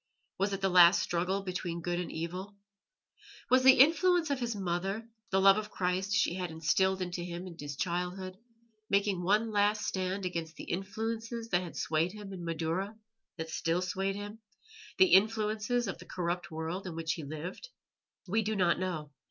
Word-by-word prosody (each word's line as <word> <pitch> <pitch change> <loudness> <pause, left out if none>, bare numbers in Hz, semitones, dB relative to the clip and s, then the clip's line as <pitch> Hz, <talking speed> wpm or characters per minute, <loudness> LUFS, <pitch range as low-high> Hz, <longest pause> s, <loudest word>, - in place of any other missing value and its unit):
Was 195 +1 +1
it 195 0 -3
the 195 - +3
last 180 0 +7
struggle 185 +3 -1
between 180 -3 -4
good 175 0 -1
and 180 - -4
evil? 180 +5 -5 1.0
Was 255 0 +6
the 265 0 +8
influence 330 +2 +5
of 275 - 0
his 235 -2 -2
mother, 195 +3 -2 0.2
the 190 - +2
love 195 +1 +7
of 210 0 -6
Christ 185 +1 -1
she 175 - +2
had 180 -1 -3
instilled 185 +4 +1
into 175 0 -4
him 175 +1 -6
in 180 -2 -9
his 145 -1 -5
childhood, 185 +2 -3 0.5
making 200 -2 +2
one 210 +5 +2
last 210 +1 +2
stand 190 +1 -2
against 165 -3 -4
the - - -8
influences 225 +5 -4
that 175 -3 +2
had 175 -2 -8
swayed 165 +4 0
him 205 -2 -8
in 180 -2 -7
Madaura 165 +5 -2 0.4
that 160 -1 -5
still 170 +3 0
swayed 195 +2 -1
him 205 +2 -7 0.6
the 375 -1 +5
influences 215 +3 +3
of - - -4
the - - -11
corrupt 175 -1 -2
world 165 +4 -4
in 170 - -6
which 160 -1 -1
he 160 - -6
lived? 155 - -7 0.6
We 220 +5 +2
do 215 +1 -1
not 185 -3 +2
know. 160 -6 -3
185 Hz, 180 wpm, -31 LUFS, 175-210 Hz, 1.0 s, the